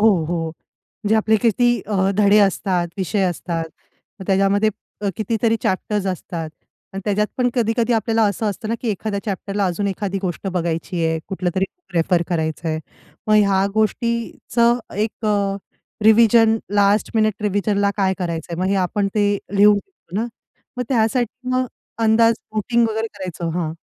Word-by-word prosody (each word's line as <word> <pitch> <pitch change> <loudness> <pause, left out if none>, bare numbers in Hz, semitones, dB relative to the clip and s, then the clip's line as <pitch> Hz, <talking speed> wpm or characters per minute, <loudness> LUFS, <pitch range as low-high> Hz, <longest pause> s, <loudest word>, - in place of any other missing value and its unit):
हो, 220 - +6 0.2
हो. 165 0 -2
म्हणजे 210 +6 -5
आपले 220 0 +3
किती 240 +1 +3
अ, 195 -2 +1
धडे 210 0 +5
असतात, 185 -3 +1
विषय 195 +2 0
असतात, 170 -2 -2 0.6
मग 190 - -8
त्याच्यामध्ये 195 +2 +3 0.3
अ, 205 - -1
कितीतरी 225 +1 +1
चॅप्टर्स 195 +1 -1
असतात 170 -3 -4 0.4
आणि 195 - -4
त्याच्यात 210 0 +1
पण 250 -1 +2
कधी-कधी 235 0 +1
आपल्याला 225 0 +1
असं 215 +2 -2
असतं 215 +2 -6
ना, 230 - 0
की 240 - -3
एखाद्या 200 0 -2
चॅप्टरला 200 0 -2
अजून 190 +3 -1
एखादी 195 0 -2
गोष्ट 180 +1 -3
बघायची 170 0 -2
आहे, 160 0 0
कुठलं 185 -2 -1
तरी 190 0 +2 0.2
प्रेफर 175 0 +1
करायचं 160 -1 -2
आहे. 155 - -1 0.5
मग 215 - +4
ह्या 200 -2 +4
गोष्टीचं 235 +2 +1 0.2
एक 215 +1 -2
अ, 200 -1 +1 0.5
रिव्हिजन 225 0 +6 0.2
लास्ट 205 +1 +3
मिनिट 215 -1 +1
रिव्हिजनला 200 0 +1
काय 190 -1 +2
करायचं 170 -2 -4
आहे? 170 - -3
मग - - +1
हे - - +2
आपण 200 +2 0
ते 205 -1 +2 0.2
लिहून 205 +1 +7
देतो 200 - -15
ना, 235 - -1 0.5
मग 250 - -1
त्यासाठी 245 +1 0
मग 255 0 +1 0.4
अंदाज 225 +1 +5 0.2
वोटिंग 235 +2 +2
वगैरे 220 +1 -2
करायचो, 180 -3 -5
हां. 165 -2 -2
205 Hz, 160 wpm, -21 LUFS, 185-220 Hz, 0.6 s, लिहून